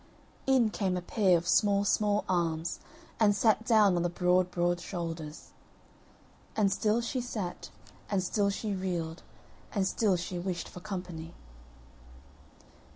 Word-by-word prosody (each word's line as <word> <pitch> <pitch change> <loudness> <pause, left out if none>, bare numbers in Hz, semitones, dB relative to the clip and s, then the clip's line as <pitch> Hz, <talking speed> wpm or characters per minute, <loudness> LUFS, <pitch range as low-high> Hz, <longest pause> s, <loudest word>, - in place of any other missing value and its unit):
In 255 -5 +4
came 190 -4 -1
a - - -3
pair 185 -2 +3
of 170 +1 -5
small 200 +1 +3
small 205 0 +1
arms, 170 -2 -1 0.4
and 205 -2 +4
sat 220 +2 +3
down 210 -5 +5
on 175 - +1
the 175 - +1
broad 180 +1 +2
broad 175 0 0
shoulders; 165 -4 -6 1.0
And 205 -3 +3
still 215 +3 +1
she 245 +2 -2
sat, 210 -7 -5 0.4
and 195 -3 +1
still 200 +2 +1
she 205 +1 -2
reeled, 175 -4 -3 0.5
and 195 -2 0
still 195 -1 +2
she 175 +1 -4
wished 175 -1 -3
for - - -10
company. 180 -4 -6
185 Hz, 140 wpm, -30 LUFS, 175-210 Hz, 1.0 s, down